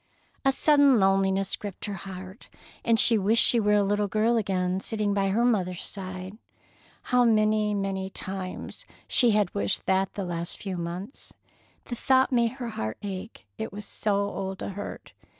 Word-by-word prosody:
A 270 - +4
sudden 285 -3 +4
loneliness 195 0 +2
gripped 205 -3 -8
her 205 - -4
heart, 190 +2 -9 0.3
and 230 -1 +3
she 230 -2 +7
wished 215 +4 +4
she 235 - +6
were 210 -1 +3
a 205 - +3
little 205 +1 0
girl 215 +4 +1
again, 190 -4 0
sitting 210 0 -2
by 195 -1 +1
her 230 +5 +2
mother's 185 -7 0
side. 185 +1 -6 0.7
How 250 0 +6
many, 215 -2 +2
many 195 -1 -2
times 190 -1 -6 0.2
she 245 - +4
had 210 -4 +2
wished 200 -1 -1
that 190 0 +1
the 200 - -3
last 170 -1 -4
few 195 -2 -5
months! 175 - -7 0.5
The 240 - -5
thought 260 +2 +2
made 235 -2 +2
her 250 -3 -6
heart 110 - -4
ache, 195 +2 -7
it 220 - -4
was 205 +1 -8
so 210 -2 -1
old 195 -1 -3
a - - -4
hurt. 200 +1 -8
200 Hz, 170 wpm, -26 LUFS, 190-220 Hz, 0.7 s, she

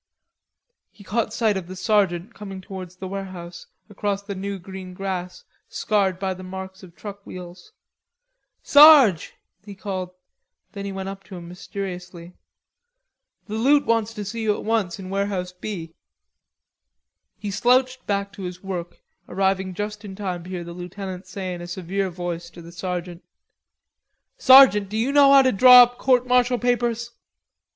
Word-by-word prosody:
He 205 - -17
caught 215 +3 -1
sight 220 -3 +1
of 180 -3 -6
the 185 - -8
sergeant 190 0 0
coming 195 -2 -8
towards 185 -2 -9
the 190 +1 -7
warehouse, 185 -3 -8 0.2
across 200 -1 -3
the 200 0 -6
new 200 +1 -5
green 185 0 -9
grass, 185 -2 -5 0.3
scarred 195 -4 0
by 190 0 -2
the 185 - -11
marks 190 0 -8
of 175 -3 -15
truck 200 -1 -9
wheels. 180 - -11 0.9
"Sarge," 285 - +7 0.3
he 205 -1 -10
called. 190 -2 -5 0.6
Then 200 -2 -7
he 200 - -4
went 190 0 -5
up 195 0 -7
to 190 - -10
him 170 -1 -9
mysteriously. 180 -1 -8 1.1
"The 210 - -8
loot 285 +4 +4
wants 225 -1 +1
to 210 -2 -5
see 225 +4 -5
you 215 -2 +1
at - - -8
once 215 -6 -1
in 190 -1 -8
Warehouse 195 -2 -2
B." 180 -3 -7 1.4
He 205 - -5
slouched 255 +5 +1
back 200 0 -2
to 200 - -10
his 180 0 -7
work, 175 -3 -6 0.3
arriving 190 0 0
just 210 +2 -5
in 195 -2 -8
time 185 -4 -4
to - - -10
hear 180 -2 -5
the 170 0 -9
lieutenant 185 +1 -7
say 190 -2 -5
in 175 - -7
a 175 - -7
severe 190 +2 -3
voice 175 -1 -5
to 170 0 -13
the 170 - -12
sergeant: 180 0 -5 1.2
"Sergeant, 260 - +7
do 215 - -4
you 240 +5 0
know 280 -1 +6
how 275 -1 +8
to 260 - +3
draw 250 +4 +9
up 245 +1 -3
court 250 -1 +3
martial 250 0 +3
papers?" 235 -1 -1
195 Hz, 165 wpm, -23 LUFS, 180-215 Hz, 1.4 s, draw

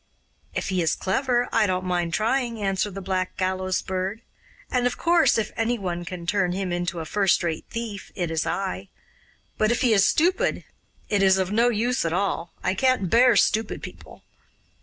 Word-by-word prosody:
'If - - -2
he 185 -2 0
is 160 -2 +1
clever, 245 +4 0
I 215 -2 +3
don't 185 0 -1
mind 175 -2 -1
trying,' 235 +1 0
answered 195 0 -1
the 195 - -6
Black 185 -1 -2
Gallows 185 0 -1
Bird; 190 +4 -3 0.5
'and, 250 -1 +2
of 245 - -3
course, 340 -5 +3
if 220 - -1
ANY 230 +2 0
one 175 -4 -4
can 175 -1 -7
turn 185 -1 +1
him 190 -1 -3
into 175 -1 -2
a - - -6
first 195 +3 +2
rate 165 -2 -2
thief, 230 -4 -6
it 175 -3 -2
is 160 -1 -1
I. 95 - -3 0.7
But 215 - +3
if 240 - 0
he 240 -4 +4
is 200 -2 +5
stupid, 370 - +2 0.4
it 205 -2 +1
is 190 -1 +5
of 190 0 -1
no 230 +3 +3
use 240 +3 0
at 165 -1 -1
all; 175 -3 -1
I - - +1
can't 200 -5 +1
bear 240 0 +6
stupid 215 +2 +1
people. - - -11
195 Hz, 190 wpm, -24 LUFS, 180-230 Hz, 0.7 s, bear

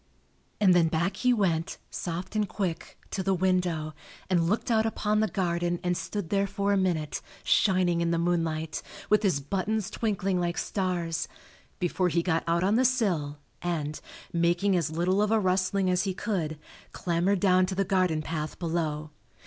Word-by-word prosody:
And 195 -3 +6
then 170 -2 +4
back 170 +5 0
he 250 - +3
went, 180 -8 +1
soft 180 +4 -4
and 210 -2 +1
quick, 185 -5 -3
to 195 - -1
the 190 0 +1
window 180 -4 0 0.4
and 170 -2 +3
looked 220 +4 0
out 220 -1 +4
upon 215 -1 0
the 220 - +3
garden 175 -3 -1
and 180 0 +1
stood 200 -1 -4
there 200 0 +2
for 200 +1 0
a - - +3
minute, 170 -6 0 0.2
shining 185 -4 +3
in 170 - +1
the 170 - +1
moonlight, 165 -2 -1 0.3
with 210 -1 +5
his 190 -9 +2
buttons 195 +7 -2
twinkling 195 -4 0
like 175 -1 -1
stars, 175 -4 -1 0.5
before 180 +1 0
he 170 0 +1
got 165 -2 +1
out 170 +1 +2
on 205 +4 +3
the 255 - +4
sill 190 - +1 0.2
and, 155 -4 -2 0.3
making 175 +3 +2
as 165 -4 +1
little 175 +5 +1
of 210 - +2
a 220 0 +3
rustling 185 0 +1
as 180 +1 +2
he 190 -2 -2
could, 170 -8 -2 0.4
clambered 180 +3 +1
down 185 -1 +4
to 190 - -3
the 195 +1 +1
garden 180 -5 +1
path 155 -1 -4
below. 160 -3 -2
180 Hz, 175 wpm, -28 LUFS, 165-195 Hz, 0.5 s, And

